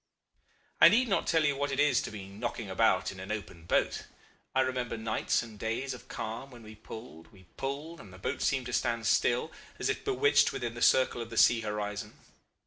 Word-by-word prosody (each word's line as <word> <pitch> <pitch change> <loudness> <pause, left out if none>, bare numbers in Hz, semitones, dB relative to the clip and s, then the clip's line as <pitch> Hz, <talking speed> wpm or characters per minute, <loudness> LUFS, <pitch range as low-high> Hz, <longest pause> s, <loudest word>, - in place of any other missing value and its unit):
"I - - +11
need 250 +2 +3
not 195 - +1
tell 160 -2 +3
you 145 -1 +2
what 145 0 -1
it 135 - -2
is 145 0 +4
to - - -5
be 100 -3 -8
knocking 100 +1 -5
about - - +2
in 95 - -11
an 95 +2 -6
open 100 -6 -6
boat. - - 0 0.5
I 130 - +5
remember 125 -3 -2
nights 110 +1 0
and 110 -3 -12
days 115 +5 -2
of 125 - -11
calm 115 +5 -5
when 120 -3 -13
we 110 0 -11
pulled, 110 -5 -11
we 95 -3 -18
pulled, 145 +5 -5
and 100 - -12
the 95 - -12
boat 95 - -3
seemed 130 -2 +1
to 125 - -5
stand 115 -2 0
still, 120 +8 +2 0.3
as - - -1
if - - -2
bewitched 430 +1 +3
within 120 -2 -4
the 120 - -8
circle 130 -1 +4
of 115 - -6
the 115 - -7
sea 115 0 +6
horizon. 105 0 -4
115 Hz, 215 wpm, -30 LUFS, 105-135 Hz, 0.5 s, I